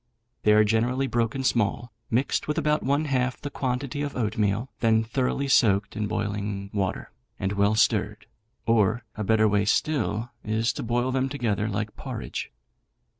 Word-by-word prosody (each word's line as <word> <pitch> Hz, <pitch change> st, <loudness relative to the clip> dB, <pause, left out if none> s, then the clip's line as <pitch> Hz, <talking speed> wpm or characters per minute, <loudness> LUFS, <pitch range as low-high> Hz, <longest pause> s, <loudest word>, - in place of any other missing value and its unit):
They 105 Hz, -, +4 dB
are 105 Hz, 0 st, +6 dB
generally 120 Hz, +5 st, +1 dB
broken 120 Hz, +1 st, -1 dB
small, 120 Hz, -1 st, 0 dB, 0.2 s
mixed 125 Hz, +4 st, 0 dB
with 150 Hz, -, -1 dB
about 150 Hz, 0 st, +2 dB
one 140 Hz, +4 st, +1 dB
half 130 Hz, -3 st, 0 dB
the 145 Hz, -, -6 dB
quantity 130 Hz, +2 st, -2 dB
of 145 Hz, -1 st, -3 dB
oatmeal, 105 Hz, +1 st, 0 dB
then 110 Hz, -1 st, +3 dB
thoroughly 130 Hz, +4 st, -1 dB
soaked 105 Hz, -7 st, +3 dB
in 105 Hz, -1 st, -1 dB
boiling 100 Hz, -1 st, -3 dB
water, 95 Hz, -3 st, -2 dB, 0.3 s
and 95 Hz, 0 st, -1 dB
well 100 Hz, +1 st, +2 dB
stirred; 110 Hz, -, +1 dB, 0.4 s
or, 115 Hz, +1 st, +2 dB
a 110 Hz, -, -3 dB
better 110 Hz, +1 st, +3 dB
way 105 Hz, -1 st, +2 dB
still 115 Hz, -1 st, 0 dB
is 110 Hz, +2 st, 0 dB
to -, -, -5 dB
boil 120 Hz, +2 st, 0 dB
them 130 Hz, +1 st, 0 dB
together 115 Hz, -7 st, -1 dB
like 105 Hz, +1 st, -3 dB
porridge. -, -, -5 dB
115 Hz, 160 wpm, -26 LUFS, 105-130 Hz, 0.4 s, are